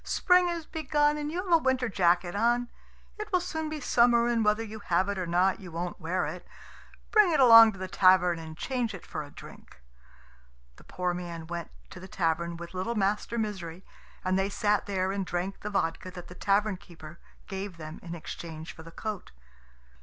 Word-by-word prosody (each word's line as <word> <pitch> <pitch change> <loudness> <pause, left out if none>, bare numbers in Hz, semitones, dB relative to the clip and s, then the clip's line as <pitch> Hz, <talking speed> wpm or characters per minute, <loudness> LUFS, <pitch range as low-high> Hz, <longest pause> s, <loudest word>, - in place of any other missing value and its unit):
"Spring 360 -1 +3
has 340 -2 -3
begun, 295 -1 +1
and 300 0 -3
you 355 +3 -2
have 360 -3 0
a - - +9
winter 260 -3 +1
jacket 175 -3 +2
on. 240 +3 +1 0.5
It 425 0 -6
will 365 - +3
soon 320 -3 -4
be 310 0 -4
summer, 235 -3 +4
and 235 -2 +1
whether 210 +1 +2
you 220 0 -8
have 185 0 +1
it 200 -1 -2
or 180 - -3
not 180 +4 +2
you 185 -4 -10
won't 175 +2 -4
wear 170 +3 -1
it. - - -6 0.7
Bring 425 -5 +5
it 310 - +2
along 230 -3 +9
to - - -12
the 185 0 -5
tavern, 185 -3 +4
and 160 -1 -9
change 245 -3 -2
it 185 - -11
for 155 - -5
a 145 - -9
drink." - - -14 1.0
The - - -16
poor 180 -1 -2
man 170 -2 -6
went 170 0 -5 0.2
to - - -9
the 190 - -10
tavern 170 -1 -1
with 170 +1 -9
little 190 +6 -2
Master 210 +3 0
Misery, 190 -5 -4 0.4
and 185 +1 +2
they 195 +1 0
sat 210 0 0
there 190 -1 0
and 195 0 -2
drank 180 +2 -3
the 210 - -5
vodka 185 -2 -1
that 175 -1 -10
the - - -9
tavern 200 +2 +1
keeper 165 -2 -13 0.3
gave 195 -2 -6
them 155 0 -8
in 170 -1 -7
exchange 160 -1 -8
for - - -12
the 165 - -11
coat. 210 +3 -6
195 Hz, 205 wpm, -28 LUFS, 175-235 Hz, 1.0 s, a